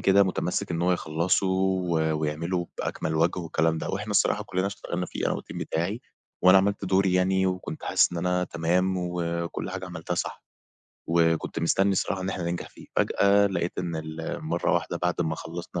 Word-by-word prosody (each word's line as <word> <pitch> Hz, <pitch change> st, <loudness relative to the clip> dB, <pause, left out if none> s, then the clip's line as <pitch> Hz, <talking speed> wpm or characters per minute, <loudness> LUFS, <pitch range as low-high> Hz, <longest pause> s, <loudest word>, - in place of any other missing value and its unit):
كده 100 Hz, +1 st, +5 dB
متمسك 90 Hz, -2 st, -1 dB
إن 85 Hz, 0 st, -1 dB
هو 90 Hz, +1 st, +3 dB
يخلصه 85 Hz, +3 st, +1 dB
و 95 Hz, -1 st, +1 dB, 0.3 s
ويعمله 85 Hz, +4 st, -1 dB
بأكمل 80 Hz, -, -2 dB
وجه 85 Hz, +3 st, +2 dB
والكلام 80 Hz, -1 st, +1 dB
ده. -, -, -4 dB
وإحنا 105 Hz, +2 st, -3 dB
الصراحة 105 Hz, +1 st, +3 dB
كلنا 95 Hz, -2 st, -1 dB
اشتغلنا 90 Hz, -3 st, -4 dB
فيه -, -, -2 dB
أنا -, -, +1 dB
و -, -, -4 dB
الTeam -, -, -10 dB
بتاعي 90 Hz, +8 st, -2 dB, 0.4 s
وأنا 90 Hz, +1 st, +8 dB
عملت 100 Hz, +1 st, 0 dB
دوري 95 Hz, 0 st, +2 dB
يعني 95 Hz, +1 st, +3 dB
وكنت 90 Hz, -3 st, -3 dB
حاسس -, -, +3 dB
إن 85 Hz, -, -3 dB
أنا 90 Hz, +1 st, +1 dB
تمام 90 Hz, +3 st, +1 dB
وكل 85 Hz, 0 st, -3 dB
حاجة 95 Hz, 0 st, -5 dB
عملتها 85 Hz, -1 st, -4 dB
صح، -, -, -4 dB, 0.6 s
وكنت 80 Hz, -1 st, +2 dB
مستني 95 Hz, +4 st, +3 dB
الصراحة 95 Hz, 0 st, 0 dB
إن 95 Hz, -, -3 dB
إحنا 95 Hz, -2 st, -3 dB
ننجح 85 Hz, 0 st, -3 dB
فيه، -, -, -15 dB
فجأة 100 Hz, 0 st, +4 dB
لقيت 90 Hz, -3 st, -2 dB
إن 85 Hz, -2 st, -2 dB
ال 80 Hz, +1 st, -5 dB
مرة -, -, +1 dB
وحدة -, -, -1 dB
بعد 90 Hz, 0 st, 0 dB
ما 80 Hz, -2 st, 0 dB
خلصنا 85 Hz, +1 st, -6 dB
90 Hz, 185 wpm, -26 LUFS, 85-95 Hz, 0.6 s, وأنا